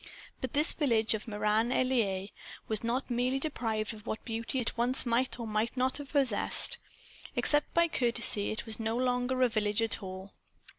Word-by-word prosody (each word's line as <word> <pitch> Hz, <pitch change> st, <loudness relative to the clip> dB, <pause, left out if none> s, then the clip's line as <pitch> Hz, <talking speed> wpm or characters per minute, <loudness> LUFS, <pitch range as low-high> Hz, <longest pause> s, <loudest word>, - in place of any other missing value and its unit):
But 260 Hz, -, -4 dB
this 300 Hz, +3 st, +5 dB
village 230 Hz, -8 st, +1 dB
of 220 Hz, +1 st, -5 dB
Meran 215 Hz, +2 st, 0 dB
en 255 Hz, -, +2 dB
Laye 200 Hz, -6 st, -1 dB, 0.4 s
was 220 Hz, 0 st, -2 dB
not 245 Hz, +3 st, -2 dB
merely 250 Hz, +2 st, 0 dB
deprived 225 Hz, -7 st, -2 dB
of 210 Hz, -1 st, -13 dB
what 220 Hz, -, -5 dB
beauty 230 Hz, +2 st, -4 dB
it 245 Hz, -3 st, -2 dB
once 245 Hz, +3 st, +5 dB
might 245 Hz, +2 st, 0 dB
or 235 Hz, -, -4 dB
might 215 Hz, +3 st, -2 dB
not 255 Hz, +1 st, +1 dB
have 285 Hz, -3 st, -9 dB
possessed. 280 Hz, -, +1 dB, 0.6 s
Except 295 Hz, 0 st, +3 dB
by 340 Hz, 0 st, +4 dB
courtesy 235 Hz, -7 st, +2 dB
it 215 Hz, -, -5 dB
was 220 Hz, -1 st, -2 dB
no 225 Hz, +1 st, -2 dB
longer 250 Hz, +1 st, 0 dB
a -, -, +5 dB
village 215 Hz, -1 st, 0 dB
at 225 Hz, -, -1 dB
all. 190 Hz, 0 st, -8 dB
235 Hz, 185 wpm, -30 LUFS, 215-255 Hz, 0.6 s, this